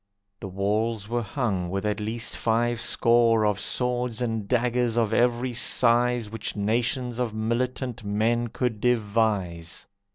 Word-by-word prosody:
The 95 - -6
walls 105 +3 -1
were 120 +1 -1
hung 100 -5 -2
with 95 +3 -3
at 105 0 -1
least 115 +3 -2
five 115 +1 0
score 115 -2 +3
Of 105 -2 +1
swords 125 +2 0
and 115 -4 -2
daggers 120 -1 +1
of 115 -3 +1
every 120 +1 +1
size 120 0 +3
Which 110 +2 -4
nations 120 +4 -1
of 115 -3 -2
militant 120 +2 -2
men 110 +4 0
could 115 -2 -3
devise. 105 -8 0
115 Hz, 135 wpm, -25 LUFS, 105-120 Hz, -, score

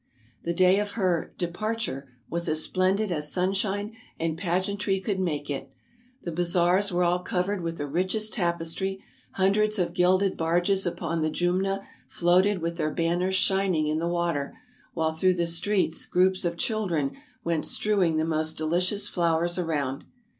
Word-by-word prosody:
The 170 - -2
day 185 +2 +5
of 205 0 -3
her 185 -6 0
" - - -39
departure 205 - -3 0.2
was 170 0 -2
as 155 0 0
splen 185 +1 +2
did 210 -1 -1
as 150 -3 -1
sunshine 195 +3 -1 0.2
and 165 -1 -1
pageantry 190 +3 0
could 195 0 -2
make 150 -6 -1
it. 140 -1 -4 0.5
The 170 - -3
bazaars 175 +3 +2
were 180 0 +2
all 175 +1 +2
covered 180 +2 -1
with 165 0 -3
the 145 - -3
richest 185 +8 0
tapestry, 175 +1 -2 0.3
hundreds 210 +3 +2
of 175 -2 0
gilded 185 +2 +3
barges 175 +4 +1
upon 170 -1 -2
the 155 - +1
Jumna 190 +4 0 0.2
floated 180 +2 +2
with 170 0 -2
their 155 -2 0
banners 175 +4 0
shining 190 -4 +2
in 155 +1 0
the 170 - -1
water, 170 -5 -1 0.4
while 160 -1 +1
through 185 +3 +2
the 170 -1 0
streets 170 +1 0
groups 185 +1 +2
of 170 0 -1
children 175 - 0 0.3
went 165 -2 0
strewing 190 -7 +1
the 155 - +1
most 160 0 -1
delicious 180 +6 0
flowers 170 0 +1
around. 145 -6 -2
175 Hz, 160 wpm, -27 LUFS, 165-195 Hz, 0.5 s, day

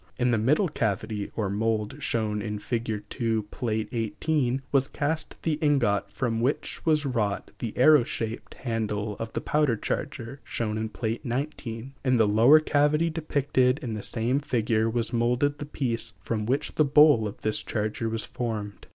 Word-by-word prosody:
In 125 0 +2
the 115 - +2
middle 150 - +3
cavity 110 - -2
or 105 -3 0
mould 110 +4 -1
shown 110 -4 -1
in 105 -1 -3
Fig. 110 -1 -3
2, 115 -4 -1
Pl. 125 - -4 0.3
XVIII, 130 +2 0
was 135 -1 +3
cast 150 +1 -2
the 155 -2 0
ingot 120 -10 +2
from 115 -2 -1
which 130 +5 -1
was 155 -2 +3
wrought 110 -6 -1
the 115 -3 -5
arrow 150 +1 +7
shaped 115 -1 -5
handle 105 -3 -2
of 115 0 -5
the - - -2
powder 150 -6 +1
charger 135 +1 -4
shown 110 -2 -3
in 110 0 -2
Pl. 115 +1 -2
XIX; 125 -2 -4
in 130 -2 +3
the 110 -2 +4
lower 115 +9 +7
cavity 150 +2 +2
depicted 140 -5 +1
in 120 -3 -3
the 105 - -4
same 120 +6 0
figure 115 -5 +1
was 120 +1 -2
moulded 125 +5 +1
the 145 - -5
piece 120 -5 -1
from 110 -2 -2
which 135 +4 0
the 155 - +3
bowl 145 -5 +6
of 100 - -9
this 110 0 0
charger 110 +1 -2
was 110 -1 -1
formed. 105 -4 -5
120 Hz, 170 wpm, -27 LUFS, 110-140 Hz, 0.3 s, arrow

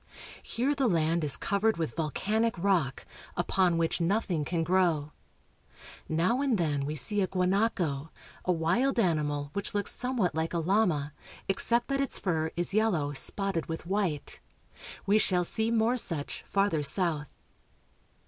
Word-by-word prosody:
Here 260 +5 -1
the 275 -3 +1
land 165 -3 +1
is 145 - +3
covered 205 +1 0
with 160 -2 -3
volcanic 210 +8 -1
rock, 170 -8 0 0.3
upon 175 0 +2
which 165 +1 0
nothing 175 -3 0
can 165 +2 -1
grow. 165 -4 +1 1.0
Now 180 +11 +1
and 270 -6 +1
then 145 -5 -1
we 150 - -3
see 205 +7 +1
a 190 - +1
gua 185 -1 0
naco, 180 -7 0 0.3
a 185 - +1
wild 180 +11 +1
animal 150 -6 0
which 200 +2 -4
looks 205 - +4
somewhat 245 -9 +1
like 160 +2 -2
a - - +2
llama, 165 -5 +1 0.3
except 235 +5 +1
that 275 0 0
its 275 - 0
fur 160 -4 -1
is 175 +2 -2
yellow 185 -10 +1
spotted 195 +4 -1
with 165 0 -5
white. 185 -6 -2 0.7
We 205 +2 +4
shall 180 -4 +2
see 220 +5 +1
more 230 +2 +2
such 160 -10 -2
farther 195 -6 +1
south. 150 0 +2
180 Hz, 150 wpm, -29 LUFS, 160-210 Hz, 1.0 s, looks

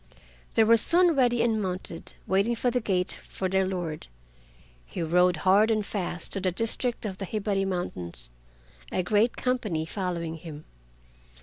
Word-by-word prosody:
They 225 - +5
were 230 +1 +5
soon 345 +8 +7
ready 245 -3 +2
and 225 -2 +1
mounted, 180 -3 -4
waiting 200 +5 +1
at 245 -2 +2
the 250 - +2
gate 185 -4 0
for 190 - -5
their 190 0 +1
lord. 175 - -4 0.8
He - - -5
rode 180 +2 +3
hard 200 +4 +5
and 215 -2 +1
fast 180 -4 -4
to 195 - -2
the 185 - +1
district 230 +5 -2
of 190 -3 -4
the 195 - -3
Hibari 200 -1 -1
Mountains, 85 - -4 0.6
a 185 - 0
great 210 +5 +1
company 215 -11 -1
following 170 -3 -4
him. 155 -2 -10
190 Hz, 155 wpm, -27 LUFS, 175-220 Hz, 0.8 s, soon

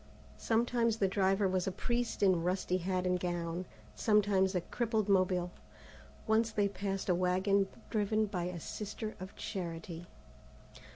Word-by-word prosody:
Sometimes 230 0 +1
the 195 - +2
driver 195 +1 +2
was 185 -1 0
a - - +1
priest 240 +3 -1
in 185 -4 +4
rusty 180 +1 0
hat 185 0 -1
and 180 0 +1
gown, 175 0 -2 0.3
sometimes 205 -3 +3
a 180 - +2
crippled 220 +2 -1
Mobile. 185 -2 +2 0.7
Once 220 0 +3
they 205 -2 +2
passed 195 -1 -3
a 180 - +4
wagon 190 +2 +2 0.2
driven 215 0 +2
by 185 -4 -3
a 180 -1 -4
Sister 215 +5 -5
of 185 +1 -8
Charity. 170 -3 -5
190 Hz, 140 wpm, -33 LUFS, 180-210 Hz, 0.7 s, in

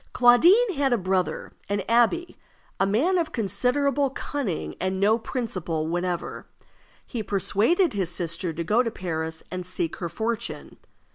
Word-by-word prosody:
Claudine 345 - +6
had 275 -3 +1
a 240 - +3
brother, 185 -2 -1 0.2
an 200 0 0
abbé, 240 +10 +2 0.5
a 195 - +3
man 310 - +2
of 320 -2 -2
considerable 270 +6 +1
cunning, 265 - -4
and 185 +1 -1
no 215 +4 +3
principle 185 -10 -3
whatever. 175 +1 -3 0.6
He 235 - -4
persuaded 215 - +1
his 190 -4 -1
sister 170 0 -2
to 165 +1 -4
go 215 +8 +3
to 240 - -1
Paris 160 -5 -4
and 185 0 -4
seek 175 -2 -3
her 170 - -4
fortune. 225 +5 -4
210 Hz, 145 wpm, -25 LUFS, 180-255 Hz, 0.6 s, Claudine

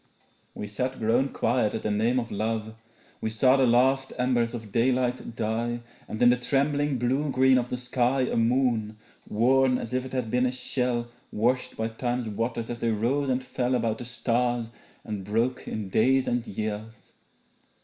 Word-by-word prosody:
We 105 - -5
sat 125 +5 -3
grown 120 +5 +2
quiet 115 -4 0
at - - -4
the 105 - 0
name 115 +5 +2
of 115 - -5
love. 110 +1 -2 0.5
We 110 - -1
saw 130 +4 +4
the 135 -2 +3
last 130 +3 +3
embers 125 -2 +1
of 110 -3 -8
daylight 125 +1 0
die 115 +2 -2 0.3
And 110 - -6
in 120 - +7
the 125 - +2
trembling 140 +3 +1
blue 130 +5 0
green 130 -1 +4
of 120 0 -4
the 125 - -2
sky 125 +1 +1
A 125 - 0
moon, 115 -2 +1 0.3
worn 130 +3 +3
as 115 - -6
if 130 0 0
it 130 - -9
had 125 -4 -2
been 125 +1 +2
a - - -1
shell 125 -1 -1 0.2
Washed 125 +4 0
by 110 - -1
time's 120 +1 -2
waters 115 +2 -3
as 120 - -5
they 115 - 0
rose 125 +6 0
and 130 0 0
fell 125 0 -1
About 115 -2 0
the 120 - -6
stars 120 -1 0 0.3
and 105 -3 -5
broke 115 +6 -1
in 105 -3 -4
days 130 +6 +3
and 120 -1 -1
years. 110 +2 -5
120 Hz, 180 wpm, -27 LUFS, 115-130 Hz, 0.5 s, in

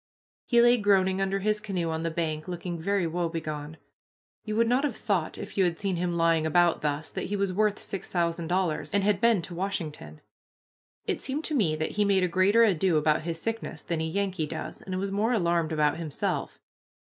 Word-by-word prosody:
He 240 - +4
lay 240 +1 +6
groaning 195 -3 +2
under 195 0 0
his 210 +1 +1
canoe 180 -6 -2
on 160 0 -2
the 165 - -1
bank, 155 -2 -3
looking 175 -1 -4
very 195 +2 0
woebegone. 160 -3 -3 0.7
You 215 -1 -3
would 230 +1 +3
not 250 +4 +2
have 280 -7 -1
thought, 190 -7 -1
if - - -6
you - - +6
had 175 -2 0
seen 195 -3 -1
him 175 0 -1
lying 165 -1 +3
about 170 +2 +3
thus, 150 +1 -2
that - - -4
he 205 - -2
was 200 -2 0
worth 210 +1 +2
six 195 -3 -5
thousand 170 -1 0
dollars 175 -3 -1
and 200 - +3
had 205 -1 +2
been 230 -6 +4
to 175 - -6
Washington. 160 - -4 0.8
It - - -1
seemed 280 +4 -2
to 310 - -1
me 180 - +2
that 155 0 -2
he 210 - +1
made 195 -2 +3
a - - +3
greater 195 +6 +4
ado 185 -5 +3
about 150 0 +2
his 165 0 -4
sickness 225 +4 -4
than 165 -2 -2
a - - 0
Yankee 185 -1 -1
does, 160 +1 -6
and 185 -1 -4
was 195 +1 -2
more 215 +5 +1
alarmed 170 -5 +1
about 150 -1 +2
himself. 160 -4 -3
180 Hz, 210 wpm, -27 LUFS, 160-200 Hz, 0.8 s, lay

